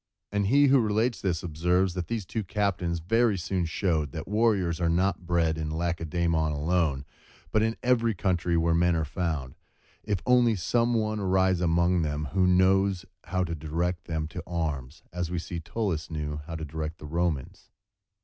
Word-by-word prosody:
And 100 -1 0
he 140 +6 +5
who 135 -1 +5
relates 110 +2 +1
this, 85 -5 -1
observes, 90 +3 +1
that 90 -1 -4
these 115 -4 -3
two 110 +6 -3
captains 95 -4 -1
very 110 +5 +2
soon 90 0 -1
showed 80 -4 -1
that - - -6
warriors 100 -6 +1
are 85 - +2
not 90 +1 0
bred 80 -2 +1
in 80 -1 -2
Lacedæmon 85 -1 0
alone, 75 -2 0 0.5
but 110 - +3
in 110 +1 0
every 115 -3 +2
country 90 -3 0
where 85 0 +2
men 85 +1 +3
are 80 -1 0
found, 75 -5 -3 0.5
if 100 -3 -1
only 125 -2 +4
some 115 +6 +1
one 110 -1 0
arise 95 -2 +2
among 85 +1 +2
them 75 -2 -2
who 95 -1 +3
knows 95 +1 +3 0.2
how 95 -1 0
to 85 -2 -3
direct 85 +3 -2
them 80 -2 -2
to - - -6
arms; 75 -3 -3
as 90 -2 -2
we 90 - -2
see 85 0 -4
Tullus 85 0 -3
knew 75 -2 -3
how 85 - -5
to 80 -1 -4
direct 80 +2 -5
the - - -11
Romans. 80 -3 -2
85 Hz, 180 wpm, -27 LUFS, 80-100 Hz, 0.5 s, he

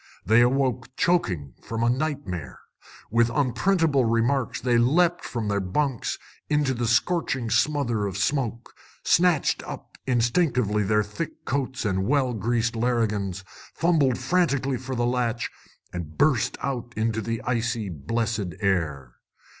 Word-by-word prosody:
They 110 +5 +5
awoke 125 0 +1
choking, 90 - +1
from 115 0 -3
a 120 - +3
nightmare. 130 - -3 0.5
With 115 +1 +3
unprintable 145 +3 +2
remarks, 115 +2 +1
they 120 -1 +2
leapt 170 +8 +3
from 115 -3 -3
their 100 0 +1
bunks 120 +7 -1 0.3
into 150 -3 +2
a 120 - +1
scorching 130 -2 +1
smother 120 -9 +1
of 95 -1 -5
smoke, 120 +1 -1 0.3
snatched 175 -4 +3
up - - -9
instinctively 120 - +2
their 105 +1 +2
thick 105 +11 -6
coats 130 -3 -2
and 95 -2 0
well 130 -2 +2
greased 115 +2 0
larrigans, 105 -5 0 0.3
fumbled 155 -7 +2
frantically 140 -7 +1
for 130 +1 -5
the 120 0 0
latch, 120 -1 -1 0.4
and 80 -3 -6
burst 135 -4 +2
out 120 -3 -3
into 110 0 0
the 115 +1 -3
icy, 120 -3 -1
blessed 100 +4 -2
air. 75 - -1
120 Hz, 130 wpm, -25 LUFS, 105-135 Hz, 0.5 s, They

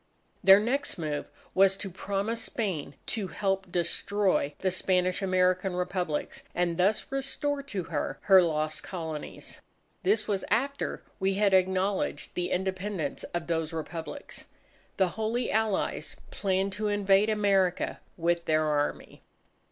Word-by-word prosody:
Their 195 +1 +9
next 260 +5 -1
move 150 -3 -3 0.3
was 195 0 +5
to 195 -1 -5
promise 200 +5 -2
Spain 185 -11 -3
to 210 -5 -2
help 195 -1 -1
destroy 180 -2 +1
the 185 - 0
Spanish 185 0 +1
American 185 0 +2
Republics, 180 -4 -2
and 175 -1 +1
thus 205 +7 +2
restore 280 +1 -1
to 205 -10 -4
her 165 -3 -3
her 190 -2 +7
lost 155 -2 -1
Colonies. 160 -5 -6 0.4
This 210 +3 +2
was 200 -3 0
after 280 +3 -1 0.2
we 190 0 +1
had 200 -1 +3
acknowledged 190 +1 +1
the 180 0 -2
Independence 190 -3 -2
of 175 -1 -4
those 165 -1 -1
Republics. 165 - -6 0.5
The 190 -2 +3
Holy 220 +5 -1
Allies 220 -2 0 0.2
planned 195 0 0
to 210 +2 -1
invade 205 0 +3
America 195 -4 +2 0.2
with 170 0 +1
their 155 0 +2
Army. 145 -1 -1
190 Hz, 130 wpm, -29 LUFS, 175-205 Hz, 0.5 s, Their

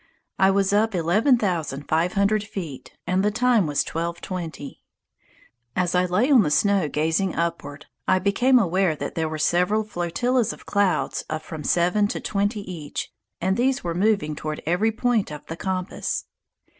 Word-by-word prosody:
I 190 - +5
was 195 0 +2
up 215 0 +2
eleven 200 - +3
thousand 160 - -2
five 165 +3 +1
hundred 200 +1 +2
feet 170 - -7
and 185 +1 +1
the 210 - +3
time 230 -3 +2
was 145 -1 +1
12.20. 170 -2 -5 1.0
As 180 -2 0
I 180 0 +3
lay 210 +10 +1
on 260 -5 +7
the 160 - +1
snow 195 0 +2
gazing 160 +6 0
upward, 145 -4 -3 0.2
I 185 - +4
became 205 +7 +3
aware 185 -5 +2
that - - -5
there 160 -1 -1
were 155 - -4
several 180 +7 +2
flotillas 215 +6 0
of - - -15
clouds 200 -2 +1
of 155 0 -3
from 155 -1 -7
seven 180 +7 +2
to - - -4
twenty 205 +1 -1
each, 170 -7 -6 0.3
and 190 +2 +1
these 265 +2 +1
were 170 -1 -2
moving 185 -5 +1
toward 155 +1 -5
every 180 +8 +2
point 230 -1 0
of 150 - -8
the 165 - -6
compass. 185 +1 -3
185 Hz, 170 wpm, -24 LUFS, 165-210 Hz, 1.0 s, on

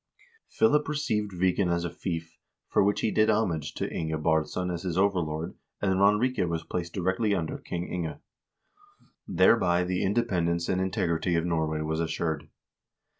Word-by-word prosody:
Philip 150 -10 +3
received 110 -9 -1
Viken 90 0 +1
as 85 0 0
a - - -2
fief, 85 -2 -5 0.3
for - - +3
which 100 +1 +1
he 110 - +1
did 110 0 +3
homage 90 -9 0
to - - -2
Inge 80 -1 -2
Baardsson 80 +3 0
as 85 - -4
his 90 -2 -3
overlord, 85 -5 0 0.3
and 95 -2 +1
Ranrike 105 -1 +3
was 85 0 -2
placed 85 -1 -4
directly 95 +3 +1
under 80 -4 -3
King 90 0 -4
Inge. 85 -3 -3 1.1
Thereby 90 -6 +4
the 90 0 -1
independence 90 -6 +1
and 95 0 +1
integrity 90 -3 0
of 85 0 +1
Norway 80 -2 0
was 80 +1 -2
assured. 80 -1 -2
90 Hz, 155 wpm, -28 LUFS, 85-100 Hz, 1.1 s, Thereby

